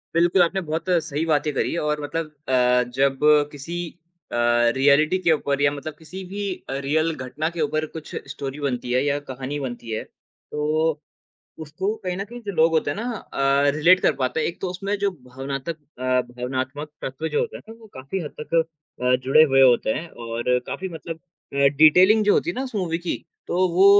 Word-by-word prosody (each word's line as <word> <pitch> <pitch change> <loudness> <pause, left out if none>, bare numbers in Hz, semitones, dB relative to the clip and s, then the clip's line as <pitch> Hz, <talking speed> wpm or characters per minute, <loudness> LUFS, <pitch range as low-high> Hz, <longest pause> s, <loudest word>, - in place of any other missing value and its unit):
बिल्कुल, 175 +2 +4
आपने 185 +3 +2
बहुत 160 +2 -2 0.2
सही 150 +3 -2
बातें 150 -1 +1
करी, - - -1
और 150 -1 -1
मतलब 155 +1 -3 0.2
अ, 125 -1 +4
जब 135 +1 +1 0.3
किसी 145 +4 -7 0.6
अ, - - -3 0.4
रिऐलिटी 145 +6 +4
के 170 -3 +2
ऊपर, 145 -2 0
या 145 0 +4
मतलब 145 +2 -6
किसी 180 +4 -8
भी 200 +3 -6 0.3
अ, - - -2
रियल 155 +3 +1
घटना 135 +5 -3
के 170 -1 -5
ऊपर 155 +1 0
कुछ 155 - -8 0.2
स्टोरी 140 0 -6
बनती 125 -4 -2
है 130 +2 +3
या 145 0 +1
कहानी 130 +3 -4
बनती 120 -4 -6
है, 110 - -2
तो 155 +1 -3 0.6
उसको 190 +8 -2
कहीं 180 -1 -2
न 195 - -3
कहीं, 240 +4 -10
जो 205 -2 -4
लोग 165 -2 +4
होते 160 - +1
हैं - - -3
ना 235 +4 -3
अ, 140 -4 +1
रिलेट 175 +4 +5
कर - - +3
पाते 130 +4 0
हैं। - - +1
एक 170 - -5
तो 185 - -2
उसमें 195 +3 -2
जो 200 0 +1
भावनातक 135 0 -6 0.2
अ, - - -7 0.3
भावनात्मक 130 +4 -4
तत्व 135 +5 -3
जो 150 - 0
होते - - -3
हैं - - -12
ना, 225 - -9
वो 225 - -14
काफ़ी 135 +9 -4
हद 150 - -6
तक 150 - -6 0.5
अ, 125 0 +4
जुड़े 135 +4 +6
हुए 135 -3 +5
होते 125 -4 +5
हैं 170 +5 -5 0.2
और 120 +2 0
काफ़ी 190 - -4
मतलब 165 -1 -7 0.4
अ, - - -4 0.2
डिटेलिंग 185 +8 +6
जो 205 - +5
होती 345 - +1
है - - -6
ना, 260 - -1
उस 255 - -8
मूवी 175 -5 -1
की, 175 0 -4 0.2
तो 185 +1 +2
वो 180 +3 +5
155 Hz, 205 wpm, -23 LUFS, 135-175 Hz, 0.6 s, जुड़े